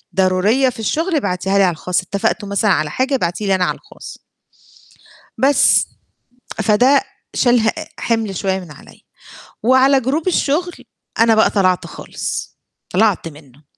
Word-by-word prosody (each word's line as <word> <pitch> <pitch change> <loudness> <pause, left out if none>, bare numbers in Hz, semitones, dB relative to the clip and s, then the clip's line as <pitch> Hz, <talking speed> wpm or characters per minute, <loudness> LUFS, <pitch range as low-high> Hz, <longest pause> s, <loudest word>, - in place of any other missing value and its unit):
ضرورية 195 +8 +2
في 235 - -10
الشُغل 320 - -1
ابعتيها 195 -5 -1
لي 195 - +5
على 180 - +3
الخاص 180 +3 -2
اتفقتو، 200 +2 -2
ا - - -8
مثلًا 200 +1 +1
على 155 -3 0
حاجة 265 - 0
ابعتي 180 -1 -2
لي 195 - +3
أنا 185 -1 +1
على - - -1
الخاص." - - -13 1.2
بس. 270 +3 +3 0.7
فدّه 250 +6 +3 0.3
شال 245 -1 +3
ه 225 0 +2 0.3
حِمل 225 -4 -1
شوية 190 +1 -1
من 175 -4 -11
عليَّ 145 - -16 0.6
وعلى 260 +3 +4
جروب 290 +8 -2
الشُغل 350 +1 0 0.5
أنا 225 0 +5
بقى 220 - +4
طلَعت 185 -3 +1
خالص، - - -6 0.4
طلَعت 200 -3 +2
منه، 145 -2 -15
210 Hz, 150 wpm, -18 LUFS, 185-260 Hz, 1.2 s, لي